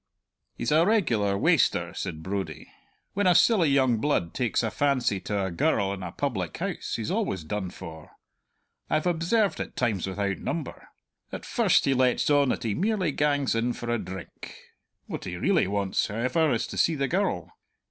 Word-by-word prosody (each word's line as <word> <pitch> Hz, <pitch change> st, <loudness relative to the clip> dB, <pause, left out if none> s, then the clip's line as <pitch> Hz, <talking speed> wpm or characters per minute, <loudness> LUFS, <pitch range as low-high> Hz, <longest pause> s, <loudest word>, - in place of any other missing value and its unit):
"He's 115 Hz, -, -2 dB
a 155 Hz, +2 st, +5 dB
regular 120 Hz, -, +2 dB
waster," -, -, +2 dB
said 80 Hz, 0 st, -5 dB
Brodie. 95 Hz, +1 st, -5 dB, 0.4 s
"When 200 Hz, -1 st, +1 dB
a 180 Hz, -, +5 dB
silly 180 Hz, -3 st, +5 dB
young 130 Hz, -4 st, +3 dB
blood 110 Hz, -, 0 dB
takes 120 Hz, -1 st, 0 dB
a 110 Hz, -, -1 dB
fancy 130 Hz, -8 st, +1 dB
to 100 Hz, 0 st, -2 dB
a 95 Hz, -, -3 dB
girl 100 Hz, -, +1 dB
in 95 Hz, -, -7 dB
a 90 Hz, -2 st, -5 dB
public 100 Hz, -, -3 dB
house -, -, -3 dB
he's -, -, -3 dB
always 95 Hz, -4 st, -1 dB
done 95 Hz, +3 st, -3 dB
for; 80 Hz, -4 st, -10 dB, 0.8 s
I've 155 Hz, +2 st, +1 dB
observed 180 Hz, +5 st, +1 dB
it -, -, -5 dB
times 110 Hz, -8 st, 0 dB
without 100 Hz, 0 st, -2 dB
number. 160 Hz, -5 st, -5 dB, 0.4 s
At -, -, -6 dB
first -, -, +3 dB
he 135 Hz, -, +3 dB
lets 130 Hz, -1 st, +2 dB
on 145 Hz, -2 st, +4 dB
that -, -, -1 dB
he 110 Hz, -3 st, 0 dB
merely 190 Hz, -, 0 dB
gangs 145 Hz, -1 st, +1 dB
in 115 Hz, +2 st, 0 dB
for 120 Hz, 0 st, -4 dB
a 120 Hz, -, 0 dB
drink; 95 Hz, -3 st, -9 dB, 0.5 s
what -, -, -6 dB
he -, -, -5 dB
really -, -, +2 dB
wants, 100 Hz, -1 st, 0 dB
however, 130 Hz, +9 st, +1 dB
is 115 Hz, -, 0 dB
to -, -, -5 dB
see 165 Hz, -, +3 dB
the 140 Hz, -1 st, 0 dB
girl. 175 Hz, -, -1 dB
120 Hz, 180 wpm, -27 LUFS, 100-155 Hz, 0.8 s, a